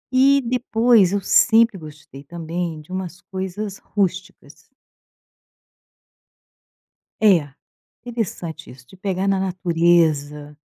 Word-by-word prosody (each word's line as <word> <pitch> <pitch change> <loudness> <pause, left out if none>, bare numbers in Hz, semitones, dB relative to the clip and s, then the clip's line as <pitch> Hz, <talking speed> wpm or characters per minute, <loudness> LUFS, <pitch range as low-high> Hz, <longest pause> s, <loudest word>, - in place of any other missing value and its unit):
e 275 +2 +5
depois 230 -4 +3
eu 205 - 0
sempre 230 +2 +4
gostei 150 -4 -12
também 170 +1 -5
de 155 - -18
umas 185 -1 -5
coisas 190 +1 -6
rústicas. 185 -6 -4 2.5
É, 165 -10 +3 0.5
interessante 180 -9 -5
isso, 125 -1 -17
de 190 - -17
pegar 190 0 -2
na 195 -1 +1
natureza. 165 -5 0
180 Hz, 95 wpm, -21 LUFS, 160-200 Hz, 2.5 s, e